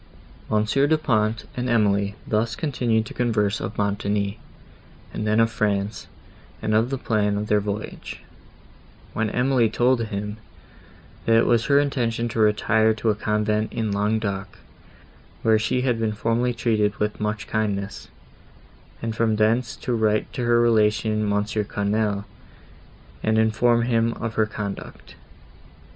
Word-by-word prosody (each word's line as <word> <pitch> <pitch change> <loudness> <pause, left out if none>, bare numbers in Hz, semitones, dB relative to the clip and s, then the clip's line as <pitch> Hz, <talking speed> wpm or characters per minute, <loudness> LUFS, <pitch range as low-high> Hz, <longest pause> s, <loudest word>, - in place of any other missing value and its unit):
Monsieur 110 +6 +2
Du 160 +1 +3
Pont 110 -6 0
and 125 0 -2
Emily 100 -3 +2
thus 110 +1 0
continued 120 -7 0
to - - -9
converse 110 -4 0
of 100 +3 -5
Montoni, 100 0 -1 0.7
and 110 - -3
then 110 +1 +3
of 115 0 +3
France, 105 -2 -1 0.5
and 110 - -1
of 110 +3 +3
the 135 - -2
plan 105 -4 0
of 105 - -2
their 105 0 +2
voyage; 105 +1 -5 0.9
when 110 -1 0
Emily 125 -2 +2
told 120 +1 +2
him, 105 0 -5 0.9
that 115 - +5
it 115 - +4
was 115 -1 +2
her 140 +3 +4
intention 120 -5 0
to 115 - -4
retire 110 +1 +3
to 110 0 +1
a - - -1
convent 105 0 0
in 110 -2 -2
Languedoc, 100 -1 -1 0.9
where 110 -1 +4
she 115 +3 0
had 125 -3 +1
been 110 -1 0
formerly 115 +3 0
treated 110 -3 +1
with 105 0 -2
much 105 0 -2
kindness, 100 -2 -2 1.0
and 115 -1 -2
from 110 -1 +1
thence 110 +3 +1
to 125 - -3
write 110 -2 +1
to 125 - -3
her 120 0 +4
relation 110 -2 +2
Monsieur 105 +1 0
Quesnel, 100 0 -1 1.0
and 110 0 +1
inform 115 +2 +3
him 115 -1 +1
of 115 0 -5
her 110 -1 +1
conduct. 105 -2 -7
110 Hz, 145 wpm, -23 LUFS, 105-115 Hz, 1.0 s, that